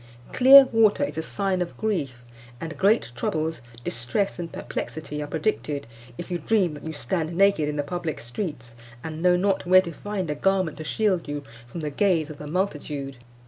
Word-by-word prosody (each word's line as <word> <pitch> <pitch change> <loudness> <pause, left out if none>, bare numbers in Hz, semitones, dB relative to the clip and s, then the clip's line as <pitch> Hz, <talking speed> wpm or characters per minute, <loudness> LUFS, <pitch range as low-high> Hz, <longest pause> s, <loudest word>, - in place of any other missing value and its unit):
Clear 270 +2 +9
water 225 +2 +4
is 220 - -3
a - - 0
sign 190 +2 -1
of 175 - -4
grief; 145 - -2 0.4
and 160 +2 -6
great 200 - +2
troubles, 155 +4 -2 0.2
distress, 120 - -2
and 170 -1 -5
perplexity 150 -1 -5
are 145 - -4
predicted, 150 -3 -2 0.3
if 175 - -7
you 175 - -1
dream 185 -1 +1
that 145 - -10
you 160 - -4
stand 160 +4 -2
naked 195 -6 +3
in 150 - -3
the 145 - -1
public 175 0 -4
streets, 120 - -6 0.3
and 160 0 -6
know 180 0 +5
not 190 -1 0
where 185 +1 +8
to 170 -2 -6
find 190 -1 -4
a - - +1
garment 185 -1 0
to 155 - -6
shield 190 +1 0
you 145 0 -4 0.2
from 160 +8 -7
the 150 -1 -3
gaze 165 -2 +1
of 150 - -11
the 150 - -7
multitude. 150 -6 -3
165 Hz, 190 wpm, -25 LUFS, 150-195 Hz, 0.4 s, Clear